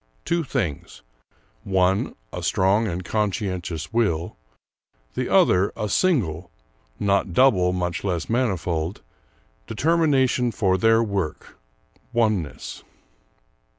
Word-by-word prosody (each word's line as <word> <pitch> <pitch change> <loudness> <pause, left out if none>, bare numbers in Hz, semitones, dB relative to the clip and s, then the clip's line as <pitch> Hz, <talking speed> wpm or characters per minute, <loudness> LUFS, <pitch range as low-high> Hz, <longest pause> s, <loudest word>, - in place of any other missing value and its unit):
Two 170 0 0
things: 80 - -4 0.6
one 95 0 +1 0.2
a - - -4
strong 100 +4 +2
and 90 -1 -4
conscientious 95 -4 -2
will, 90 -8 0 0.8
the - - -2
other 95 +3 +4
a 105 - -2
single 95 - +1 0.5
not 100 -2 +1
double, 95 -7 +4
much 90 -2 -2
less 90 -4 -2
manifold 90 -8 -1 0.6
determination 130 -2 +2
for 95 -4 +1
their 115 +3 +4
work, 100 -7 -4 0.5
oneness. 110 -10 -1
100 Hz, 95 wpm, -23 LUFS, 90-115 Hz, 0.8 s, other